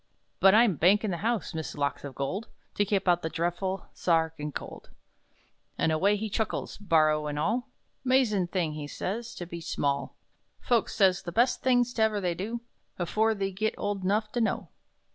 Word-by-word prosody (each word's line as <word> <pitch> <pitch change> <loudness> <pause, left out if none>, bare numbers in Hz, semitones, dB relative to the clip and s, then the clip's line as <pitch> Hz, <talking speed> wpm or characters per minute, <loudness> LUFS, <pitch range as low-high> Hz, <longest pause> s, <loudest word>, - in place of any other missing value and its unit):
But 195 +1 +7
I'm 220 -7 +5
bankin' 200 +6 +4
the 175 - -2
house, 225 0 -1
Miss 160 -1 -4
Locks 140 -1 -2
o 140 - -5
gold, 140 - -3 0.3
To 205 - +1
keep 195 -1 0
out 175 -1 +4
the 160 - -2
dreadful 175 +3 -2
Sa 170 - +2
archin' 160 -2 -1
Cold!" - - -8 0.9
And 160 - +2
away 195 +6 +3
he 215 +2 -3
chuckles, 220 +1 -2
barrow 155 -5 +3
and 145 0 -3
all: 220 - 0 0.3
"'Mazin' 245 -8 +3
thing," 170 -4 -1
he 150 -1 -5
says, 225 +9 -4
"to 175 - -6
be 170 0 -7
small! 140 -3 -1 0.4
Folks 240 -3 +1
says 190 -3 +4
the 175 - -6
best 240 +7 +2
things 245 -1 +3
't 225 - -2
ever 220 -1 +3
they 180 -3 0
do 215 +7 -4 0.4
Afore 220 +6 +1
they 195 -1 -2
git 215 +4 -1
old 205 -2 -2
'nough 210 +3 +1
to 240 - -1
know!" 225 - -1
190 Hz, 185 wpm, -28 LUFS, 165-220 Hz, 0.9 s, But